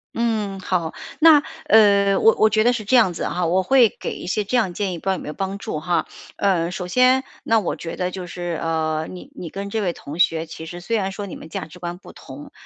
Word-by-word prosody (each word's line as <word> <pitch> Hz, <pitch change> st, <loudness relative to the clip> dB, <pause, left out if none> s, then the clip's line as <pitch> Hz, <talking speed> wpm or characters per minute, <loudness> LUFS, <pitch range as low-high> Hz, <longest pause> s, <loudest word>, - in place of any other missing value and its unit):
嗯， 215 Hz, -4 st, -1 dB
好。 180 Hz, -3 st, -1 dB, 0.3 s
那， 310 Hz, -2 st, +7 dB, 0.2 s
呃， 200 Hz, -6 st, +5 dB
我 225 Hz, -, +5 dB
我 220 Hz, -, +5 dB
觉 215 Hz, 0 st, +2 dB
得 245 Hz, +2 st, +4 dB
是 225 Hz, -, -3 dB
这 215 Hz, +6 st, +2 dB
样 215 Hz, -7 st, +4 dB
子 -, -, -5 dB
啊， 180 Hz, 0 st, -1 dB
我 180 Hz, +3 st, +2 dB
会 250 Hz, -1 st, +4 dB
给 -, -, -4 dB
一 -, -, -8 dB
些 210 Hz, +4 st, -1 dB
这 245 Hz, +5 st, 0 dB
样 190 Hz, -7 st, +1 dB
建 195 Hz, -1 st, -2 dB
议， -, -, -5 dB
不 -, -, -13 dB
知 -, -, -1 dB
道 -, -, +3 dB
有 185 Hz, -, -4 dB
没 -, -, -9 dB
有 150 Hz, -, -4 dB
帮 195 Hz, +1 st, -3 dB
助 155 Hz, -, -4 dB
哈。 170 Hz, 0 st, -1 dB, 0.3 s
呃， 175 Hz, -4 st, +1 dB
首 180 Hz, -1 st, -5 dB
先 255 Hz, +5 st, +4 dB, 0.2 s
那 225 Hz, 0 st, +3 dB
我 195 Hz, -, -2 dB
觉 165 Hz, -, -6 dB
得 180 Hz, 0 st, -2 dB
就 185 Hz, 0 st, -6 dB
是， 175 Hz, -1 st, -4 dB
呃， 160 Hz, -1 st, -1 dB
你 180 Hz, -, -10 dB
你 170 Hz, -, -7 dB
跟 200 Hz, 0 st, -5 dB
这 220 Hz, +1 st, -2 dB
位 175 Hz, -3 st, -1 dB
同 145 Hz, +4 st, -9 dB
学 165 Hz, -2 st, +2 dB
其 160 Hz, 0 st, -9 dB
实 175 Hz, +2 st, -8 dB
虽 230 Hz, +6 st, -1 dB
然 195 Hz, -2 st, -1 dB
说 200 Hz, +1 st, -6 dB
你 185 Hz, -, -7 dB
们 -, -, -10 dB
价 160 Hz, -, -5 dB
值 165 Hz, +3 st, -14 dB
观 175 Hz, 0 st, -6 dB
不 -, -, -13 dB
同， 135 Hz, +2 st, -11 dB
190 Hz, 285 characters per minute, -22 LUFS, 170-215 Hz, 0.3 s, 那